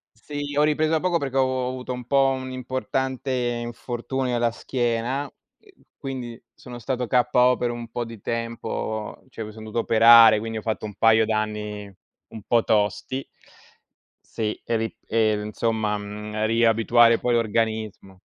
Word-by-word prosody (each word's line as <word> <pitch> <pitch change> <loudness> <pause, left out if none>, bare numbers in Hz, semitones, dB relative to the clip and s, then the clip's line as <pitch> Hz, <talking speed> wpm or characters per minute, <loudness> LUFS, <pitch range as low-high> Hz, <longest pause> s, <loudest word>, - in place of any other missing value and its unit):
Sì, 145 -1 -6
ho 145 - +4
ripreso 155 +1 +2
da 160 -1 +2
poco 180 -1 +1
perché 135 -3 -4
ho - - +5
avu 130 -1 -1
avuto 125 0 -5
un 125 0 -6
po' 135 +1 +3
un 130 -1 -4
importante 130 +1 -3
infortunio 120 +1 -3
alla 120 0 +2
schiena, 120 +2 -2
uhm 140 - -12 0.7
quindi 125 -4 -6
sono 120 -1 -10
stato 125 +1 -3
KO 125 0 +3
per 120 - -1
un 120 -1 -7
po' 120 +1 -3
di 115 -2 -10
tempo, 115 -2 -4
cioè 115 -3 -6
mi 105 - -8
son 110 0 -11
dovuto 110 +2 -2
operare, 115 -1 +7
quindi 115 +1 -4
ho - - -7
fatto 110 0 -3
un 105 - -8
paio 110 +1 +4
d'anni 105 -2 -3 0.4
un 110 - -10
po' 120 -1 +3
tosti. 110 +6 0 1.1
Sì, 110 -1 -2
e 115 - -1
ri 115 0 -3
ehm 110 -2 +1
insomma, 110 -1 -1
mhmm, 105 +1 -5
riabituare 115 +1 +4
poi 125 - 0
l'organismo 110 -4 -1
115 Hz, 160 wpm, -24 LUFS, 110-130 Hz, 1.1 s, operare